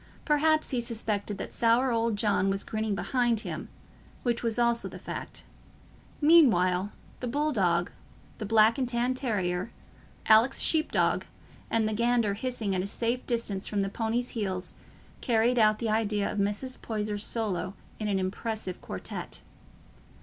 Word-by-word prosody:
Perhaps 310 +1 +2
he 250 -2 0
suspected 215 -3 -2
that - - -6
sour 235 +3 +3
old 230 -1 +1
John 205 -2 +2
was 195 0 -1
grinning 215 -2 -2
behind 240 -1 +1
him—which 240 0 -6
was 230 -1 -1
also 235 -1 +2
the - - -9
fact. - - -7 0.8
Meanwhile 205 - +5 0.3
the 250 - -4
bull 295 +5 0
dog, 175 -6 +1 0.5
the 215 - -3
black 225 +4 +5
and 255 -2 0
tan 245 +1 +1
terrier, 200 -7 -1 0.6
Alick's 220 +4 +5
sheep 315 -1 +2
dog, - - +1 0.4
and 225 -1 +2
the 215 - -1
gander 235 -2 +2
hissing 225 -2 -2
at 185 - 0
a 190 - -3
safe 235 +4 -1
distance 230 -5 -2
from 200 -2 0
the 195 - -2
pony's 230 +4 -1
heels 190 -5 -3 0.5
carried 235 +1 +2
out 215 -1 +5
the 225 0 -2
idea 215 -2 0
of 210 - -3
Mrs. 205 +6 -2
Poyser's 210 -2 -2
solo 195 -5 -2 0.2
in 215 - -2
an 200 -2 +1
impressive 190 +1 -3
quartet. 95 - -6
220 Hz, 150 wpm, -28 LUFS, 200-240 Hz, 0.8 s, Meanwhile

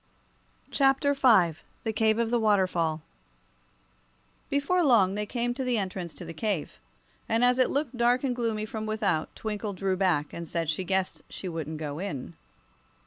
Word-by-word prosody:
Chapter 275 +1 +3
V 215 - +4 0.2
The 220 - -1
Cave 220 0 +2
of 230 -1 0
the 240 - +3
Waterfall 185 -7 +1 1.5
BEFORE 315 +6 +2
long 220 - +4
they 210 +1 -3
came 240 +1 -1
to 265 +2 -3
the 250 -2 +1
entrance 185 -4 -4
to 175 - -8
the 165 - -7
cave, 170 - -3 0.5
and 225 +2 +2
as 250 +1 +3
it 255 - +4
looked 280 -3 -1
dark 245 +2 +3
and 255 -3 0
gloomy 225 -3 -1
from 220 0 -5
without 210 -7 -1
Twinkle 210 -1 -4
drew 190 0 -1
back 180 -6 +1
and 170 0 -6
said 165 -2 0
she 170 +4 -3
guessed 190 0 -1
she 190 - -6
wouldn't 160 -2 -4
go 150 -1 -5
in. 185 -9 -5
210 Hz, 170 wpm, -28 LUFS, 175-240 Hz, 1.5 s, V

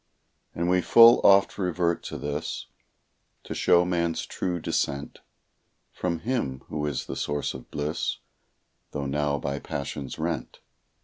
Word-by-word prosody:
And 85 +1 -1
we 90 0 +3
full 115 +5 +8
oft 100 +1 +5
revert 90 -2 0
to - - -5
this, 75 0 -4 0.8
To - - -6
show 90 0 +4
man's 85 -2 -1
true 90 -2 -3
descent 70 -3 -2 0.7
From 85 -2 -3
Him 110 - -2
who 75 0 -2
is 70 -3 -3
the - - -5
source 75 0 -2
of 65 -2 -10
bliss, 75 +2 -2 0.8
Tho' 70 - -3
now 70 +1 0
by 70 0 -3
passions 70 -1 -5
rent. 80 -4 -3
80 Hz, 135 wpm, -26 LUFS, 70-90 Hz, 0.8 s, full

